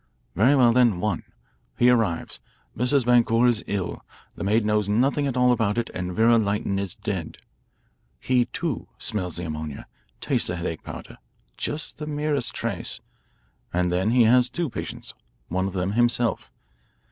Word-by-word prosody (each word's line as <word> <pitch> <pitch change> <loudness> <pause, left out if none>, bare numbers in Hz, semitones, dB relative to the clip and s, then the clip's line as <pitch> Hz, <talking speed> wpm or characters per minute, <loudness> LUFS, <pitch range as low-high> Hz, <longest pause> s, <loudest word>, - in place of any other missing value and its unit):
"Very 125 +9 +4
well, 120 -3 +5
then 120 -7 +4
one. 105 -3 -1 0.6
He 125 +1 +5
arrives, 110 -9 0 0.4
Mrs. 125 +2 +2
Boncour 120 -1 +4
is 120 -3 +2
ill, 100 -4 -3 0.3
the - - -7
maid 105 +2 +2
knows 105 -1 +1
nothing 135 +7 +2
at 130 -2 -2
all 125 0 +4
about 110 -3 +1
it, 120 - -1
and 90 0 -3
Vera 115 +4 +4
Lytton 100 -2 -1
is 100 -3 -2
dead. - - -4 0.8
He, 125 - +2
too, 160 -3 -4
smells 95 -6 -1
the 90 - -4
ammonia, 75 -2 -5 0.3
tastes - - 0
the 90 - -2
headache 85 -2 -4
powder - - -9 0.4
just 150 0 -2
the 150 - -5
merest 145 -4 -1
trace - - -3 0.7
and 90 0 0
then 95 +4 +1
he 120 +1 +5
has 125 +2 +4
two 170 -6 -3
patients, - - -6 0.4
one 95 +2 0
of 95 - -5
them 95 0 -1
himself. 120 +1 +1
115 Hz, 160 wpm, -24 LUFS, 95-125 Hz, 0.8 s, well